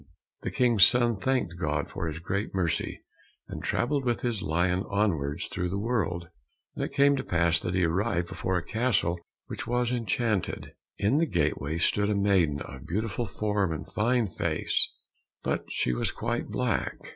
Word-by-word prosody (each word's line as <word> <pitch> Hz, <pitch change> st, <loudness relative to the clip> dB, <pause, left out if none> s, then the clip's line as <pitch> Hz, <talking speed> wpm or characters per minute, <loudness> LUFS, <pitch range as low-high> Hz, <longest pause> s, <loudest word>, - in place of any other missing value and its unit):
The -, -, -2 dB
King's 120 Hz, -6 st, +4 dB
son 120 Hz, -2 st, +5 dB
thanked 100 Hz, -5 st, -1 dB
God 75 Hz, -2 st, 0 dB
for 85 Hz, -, -4 dB
his 80 Hz, 0 st, -3 dB
great 95 Hz, +5 st, -3 dB
mercy, 90 Hz, -4 st, -1 dB, 0.5 s
and -, -, -6 dB
travelled 140 Hz, +2 st, 0 dB
with 120 Hz, -2 st, 0 dB
his 120 Hz, -5 st, -1 dB
lion 90 Hz, +4 st, +1 dB
onwards 85 Hz, -6 st, 0 dB
through 90 Hz, -1 st, -3 dB
the 95 Hz, -, -2 dB
world. 95 Hz, -6 st, -1 dB, 0.5 s
And -, -, -3 dB
it -, -, -3 dB
came 140 Hz, 0 st, +4 dB
to -, -, -2 dB
pass 85 Hz, -1 st, +2 dB
that 90 Hz, +2 st, -3 dB
he 90 Hz, -2 st, +3 dB
arrived 85 Hz, +1 st, 0 dB
before 95 Hz, +1 st, -1 dB
a 90 Hz, -, -2 dB
castle 110 Hz, -6 st, +1 dB, 0.3 s
which -, -, -6 dB
was 120 Hz, 0 st, +1 dB
enchanted. 115 Hz, -3 st, -1 dB, 0.2 s
In 115 Hz, +9 st, +2 dB
the 165 Hz, -, +2 dB
gateway 75 Hz, -, 0 dB
stood 100 Hz, +4 st, +2 dB
a 105 Hz, -, +2 dB
maiden 95 Hz, -8 st, +2 dB
of 65 Hz, -1 st, -10 dB
beautiful 110 Hz, +5 st, -1 dB
form 105 Hz, -2 st, 0 dB
and 80 Hz, -, -4 dB
fine 120 Hz, +2 st, +2 dB
face, 90 Hz, -, 0 dB, 0.5 s
but -, -, -1 dB
she 65 Hz, -, 0 dB
was -, -, 0 dB
quite -, -, -2 dB
black. -, -, -1 dB
100 Hz, 170 wpm, -28 LUFS, 85-115 Hz, 0.5 s, son